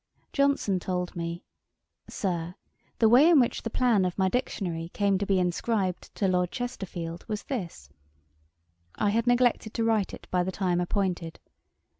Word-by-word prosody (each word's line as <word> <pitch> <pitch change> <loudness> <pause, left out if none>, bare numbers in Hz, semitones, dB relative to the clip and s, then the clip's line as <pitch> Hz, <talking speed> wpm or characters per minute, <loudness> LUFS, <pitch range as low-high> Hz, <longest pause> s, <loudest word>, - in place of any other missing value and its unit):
Johnson 280 -9 +2
told 180 0 -3
me, 170 0 -4 0.7
'Sir, 175 -2 -3 0.4
the 225 - +5
way 255 +8 +7
in 330 -4 +7
which 245 - +1
the 230 - -4
Plan 230 -4 +2
of 180 -1 -2
my 190 -1 +2
Dictionary 175 -8 -2
came 200 -2 +2
to 200 - -2
be 195 - +3
inscribed 185 +1 -1
to 195 - +1
Lord 180 -1 +1
Chesterfield, 175 -9 -5
was 210 -2 -3
this: 180 - -5 1.1
I 205 - +1
had 230 +3 0
neglected 245 -3 +2
to 230 - 0
write 220 -3 +1
it - - -10
by 180 - +2
the 190 - -2
time 180 -2 0
appointed. 175 -3 -2
195 Hz, 160 wpm, -27 LUFS, 180-230 Hz, 1.1 s, way